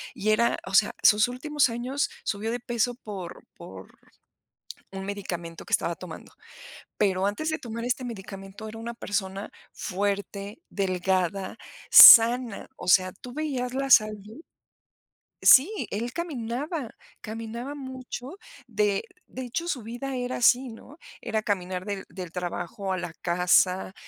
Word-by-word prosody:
Y 215 - -2
era, 235 +2 +2
o 190 - -8
sea, 205 +2 +4
sus 210 +2 +6
últimos 275 +4 0
años 250 +5 -2
subió 215 +2 -3
de 240 0 -4
peso 240 0 -1
por 200 -7 -8
por - - -12 0.9
un 190 0 -6
medicamento 175 -4 -6
que - - -12
estaba - - 0
tomando, - - -11 0.7
pero 190 -2 +1
antes 225 +11 -2
de 315 - -1
tomar 230 -4 -6
este 250 +1 -1
medicamento 195 -2 -8
era 220 - -9
una 235 +1 -6
persona 200 -3 -4 0.2
fuerte, 200 - -4
delgada, 190 0 -1 0.3
sana, 235 -1 +9
o - - -10
sea, 185 0 +5
tú 250 - -11
veías 265 -4 -3
la 275 +1 -2
salud 215 +2 +3 1.0
Sí, 370 +12 +6
él 235 +4 -3
caminaba, 285 -3 -4 0.2
caminaba 230 +5 -6
mucho, 260 +3 -8 0.3
de 210 -4 0 0.2
de 260 - -8
hecho, 270 +8 -4
su 265 -9 -3
vida 245 +4 -5
era 250 0 -3
así, 250 +2 +3
¿no? 245 +6 -13 0.2
Era 220 -2 -2
caminar 185 -4 -3
del 200 -2 -5
del 180 -3 -8
trabajo 185 +3 -4
a - - -2
la 175 -2 -6
casa, 180 +2 +2
220 Hz, 140 wpm, -26 LUFS, 195-250 Hz, 1.0 s, sana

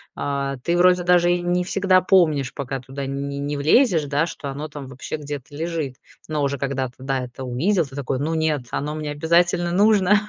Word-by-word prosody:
а, 140 -1 -2
ты 170 +1 +1
вроде 180 0 +4
даже 175 0 +4
и 175 - -1
не 175 +1 0
всегда 185 0 +3
помнишь, 155 -9 +3
пока 135 -1 -4
туда 135 +2 -6
не 140 +1 -4
не 145 +1 -2
влезешь, 160 - +4
да, 145 +3 +1
что 145 -4 -6
оно 145 +3 -5
там 145 -2 -8
вообще 130 +3 -6
где-то 145 -3 -7
лежит. 160 -4 -3 0.3
Но 155 -1 -1
уже 140 0 0
когда 135 -1 -2
ты, 125 - -17
да, 135 0 -1
это 125 +2 -9
увидел, 160 +9 +1
ты 135 -1 -12
такой: 135 -2 -2
"Ну, 155 +4 -1
нет, 155 -4 0
оно 150 +2 -2
мне 155 -1 -4
обязательно 170 +3 +2
нужно. 205 +1 +4
150 Hz, 205 wpm, -22 LUFS, 140-175 Hz, 0.3 s, вроде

